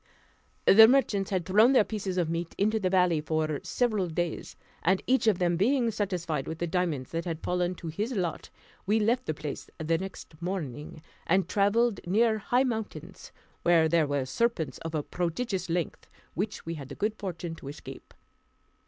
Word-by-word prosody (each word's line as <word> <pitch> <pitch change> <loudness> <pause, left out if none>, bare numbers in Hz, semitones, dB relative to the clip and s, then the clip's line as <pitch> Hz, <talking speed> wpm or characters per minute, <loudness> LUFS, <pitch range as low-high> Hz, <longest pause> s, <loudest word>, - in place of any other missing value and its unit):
The 220 +3 +9
merchants 225 -7 +2
had 185 -4 -1
thrown 215 +7 +5
their 250 - +6
pieces 200 -4 -4
of 175 -3 +1
meat 165 +1 -3
into 215 +2 +2
the 185 -3 0
valley 180 -4 +3
for 155 -1 -1
several 215 -7 0
days; 170 0 -3 0.3
and 185 +2 +2
each 260 -2 +2
of 210 -5 +4
them 175 -1 +1
being 235 +4 +2
satisfied 180 -9 -2
with 160 - -4
the 175 - -1
diamonds 170 -7 -1
that 165 +1 -3
had 165 -2 -4
fallen 180 0 0
to 170 - -8
his 205 +10 -3
lot, 180 -6 -3 0.4
we 215 +2 +3
left 235 +4 +1
the 155 - -1
place 150 -1 -6
the 165 +1 0
next 180 -4 -9
morning, 155 -4 -5 0.2
and 190 +2 +2
travelled 210 +2 +2
near 220 +3 +3
high 245 +5 +2
mountains, 205 - -5 0.3
where 170 -2 +4
there 160 -1 +2
were 140 -2 -1
serpents 160 - -1
of 165 0 -5
a 150 - -1
prodigious 180 +4 -2
length, 170 -1 -2 0.3
which 200 +5 -3
we 165 - -3
had 140 -5 -8
the 140 - -7
good 210 +1 -1
fortune 175 -4 -5
to 160 - -10
escape. 145 - -10
180 Hz, 180 wpm, -28 LUFS, 160-210 Hz, 0.4 s, The